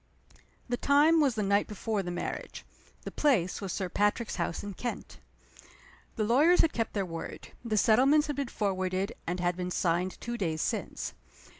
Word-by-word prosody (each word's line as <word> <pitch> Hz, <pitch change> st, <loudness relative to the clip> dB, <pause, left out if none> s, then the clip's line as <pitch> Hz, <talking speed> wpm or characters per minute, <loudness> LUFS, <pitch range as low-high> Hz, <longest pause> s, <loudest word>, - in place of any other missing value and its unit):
THE 245 Hz, -1 st, -1 dB
time 295 Hz, +5 st, +4 dB
was 270 Hz, -5 st, +2 dB
the 215 Hz, -, -1 dB
night 200 Hz, +1 st, +2 dB
before 210 Hz, 0 st, -2 dB
the 180 Hz, -, -5 dB
marriage. 175 Hz, -, -5 dB, 0.4 s
The -, -, -6 dB
place 215 Hz, -, +1 dB
was 195 Hz, -2 st, -4 dB
Sir 190 Hz, +1 st, -2 dB
Patrick's 210 Hz, +5 st, 0 dB
house 170 Hz, -1 st, -2 dB
in 205 Hz, -1 st, -5 dB
Kent. 240 Hz, +5 st, -6 dB, 1.0 s
The 220 Hz, -, 0 dB
lawyers 290 Hz, +11 st, +5 dB
had 325 Hz, -, +1 dB
kept 225 Hz, -1 st, -2 dB
their 200 Hz, -2 st, -1 dB
word. 165 Hz, -2 st, -7 dB
The 220 Hz, -3 st, -1 dB
settlements 270 Hz, +9 st, +5 dB
had 295 Hz, -, -3 dB
been 280 Hz, -2 st, -1 dB
forwarded, 190 Hz, 0 st, -1 dB
and 180 Hz, +2 st, -2 dB
had 175 Hz, 0 st, 0 dB
been 180 Hz, 0 st, -3 dB
signed 180 Hz, +1 st, 0 dB
two 235 Hz, 0 st, -5 dB
days 160 Hz, -4 st, -1 dB
since. -, -, -3 dB
210 Hz, 175 wpm, -29 LUFS, 185-245 Hz, 1.0 s, lawyers